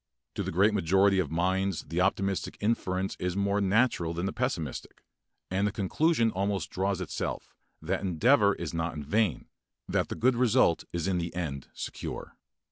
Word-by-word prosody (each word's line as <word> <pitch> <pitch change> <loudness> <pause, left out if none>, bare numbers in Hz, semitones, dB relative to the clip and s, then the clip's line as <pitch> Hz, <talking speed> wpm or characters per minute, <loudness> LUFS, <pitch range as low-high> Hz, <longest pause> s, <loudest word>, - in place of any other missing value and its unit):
To - - -3
the - - -3
great 100 +5 +3
majority 95 +1 +3
of 85 -6 0
minds 95 +2 0
the 85 +2 -2
optimistic 95 +1 0
inference 95 -3 -1
is 90 0 -2
more 100 +1 +1
natural 95 -5 +2
than 85 +2 -2
the 95 - -2
pessimistic, 95 - -3 0.5
and 100 +2 +1
the - - -1
conclusion 115 - +1
almost 100 -2 -2
draws 95 0 -1
itself 90 - -4 0.3
that - - -1
endeavor 100 - +3
is 85 -1 -5
not 80 0 -2
in 75 - -5
vain, 105 +3 0 0.4
that - - 0
the - - -3
good 130 +1 +3
result 120 -7 +3
is 85 +1 -2
in 95 -2 +1
the 85 0 -3
end 70 -7 -4
secure. - - -6
95 Hz, 170 wpm, -29 LUFS, 85-105 Hz, 0.5 s, great